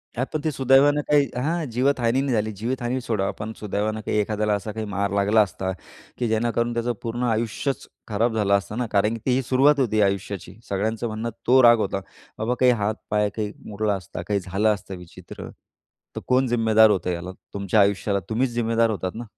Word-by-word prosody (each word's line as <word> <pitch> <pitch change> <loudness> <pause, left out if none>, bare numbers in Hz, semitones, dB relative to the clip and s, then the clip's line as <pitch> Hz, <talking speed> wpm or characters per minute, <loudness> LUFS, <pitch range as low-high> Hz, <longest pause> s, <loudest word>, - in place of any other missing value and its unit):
हां, 125 +2 0
पण 155 - 0
ती 155 - 0
सुदैवानं 135 +2 +4
काही 145 -1 +5 0.2
हा 165 +3 0
जीवितहानी 125 0 +1
नाही 135 -2 -1
झाली. 110 -1 0
जीवितहानी 120 +4 -2
सोडा 110 -5 -1
पण 105 +1 -4
सुदैवानं 105 +1 -2
काही - - 0
एखाद्याला 105 0 0
असा 100 +1 -3
काही 110 +1 -4
मार 100 0 -2
लागला 100 +2 +4
असता, 95 -2 -2 0.5
की 120 - -1
जेणेकरून 120 +1 0
त्याचं 120 +1 -1
पूर्ण 120 +2 -3
आयुष्यच 115 +4 -1 0.2
खराब 110 +2 0
झालं 100 -2 +1
असतं 100 +2 -6
ना. 125 - 0
कारण 105 +2 +2
की 115 - -5
ती 130 0 +2
सुरुवात 135 +4 +3
होती 110 -5 +2
आयुष्याची. 100 -2 -2
सगळ्यांचं 110 +4 -1
म्हणणं 110 +1 -4 0.2
तो 130 +2 +6
राग 120 0 +8
होता. 100 -2 -1 0.4
बाबा 110 +3 -1
काही 125 -1 +5
हात-पाय 105 -1 -1
काही 105 -2 -2 0.2
मोडला 105 0 -1
असता 90 -3 -7
काही 105 -1 +1
झालं 95 +4 0
असतं 100 -1 -8
विचित्र 90 -1 -11 0.7
तर - - -3
कोण 130 +1 +3
जिम्मेदार 110 -2 +4
होतं 90 -3 0
याला? 85 +1 -5 0.2
तुमच्या 100 +1 +1
आयुष्याला 100 0 +1
तुम्हीच 120 +3 +1
जिम्मेदार 115 -1 +1
होतात 95 -4 -3
ना. 120 - -5
110 Hz, 190 wpm, -24 LUFS, 100-120 Hz, 0.7 s, राग